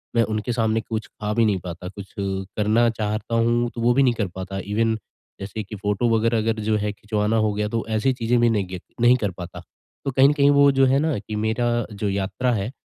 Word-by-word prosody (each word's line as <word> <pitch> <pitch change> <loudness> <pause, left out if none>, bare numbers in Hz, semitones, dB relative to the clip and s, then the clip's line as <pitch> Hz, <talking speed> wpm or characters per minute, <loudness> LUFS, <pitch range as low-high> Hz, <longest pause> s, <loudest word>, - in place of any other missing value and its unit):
मैं 115 - +4
उनके 110 +3 -2
सामने 115 -1 +1
कुछ 110 +1 -4
खा 105 0 -4
भी 115 0 +3
नहीं 100 -3 +1
पाता, 90 0 -7
कुछ 100 0 -10
अ, - - -1 0.3
करना 110 +3 +3
चाहता 110 +1 -3
हूँ, 120 +1 +2
तो 115 - -4
वो 120 +1 +4
भी 135 +2 +4
नहीं 125 -2 +3
कर 105 -4 -2
पाता। 95 +1 -5
इवेन 110 +2 +1 0.4
जैसे 100 +3 -5
कि 105 +2 -8
फोटो 105 +3 0
वगैरह 115 +1 +1
अगर 110 0 0
जो 110 0 +2
है 105 0 -1
खिंचवाना 105 +1 -1
हो 105 - +1
गया, 105 0 -1
तो 115 0 -2
ऐसी 120 +5 +2
चीज़ें 120 0 +1
भी 120 - +4
नहीं 105 -4 +1
गी 90 -1 -6 0.2
नहीं 120 +1 +6
कर 100 - 0
पाता। 90 -1 -7 0.5
तो 135 - 0
कहीं 135 +2 +5
न - - +2
कहीं 140 -1 +4
वो 140 0 +7
जो 135 0 +4
है 135 +2 +3
ना, 155 -5 0
कि 110 - -7
मेरा 110 +3 0 0.3
जो 100 0 -2
यात्रा 100 +6 -1
है, 110 +2 -2
110 Hz, 245 wpm, -23 LUFS, 105-120 Hz, 0.5 s, वो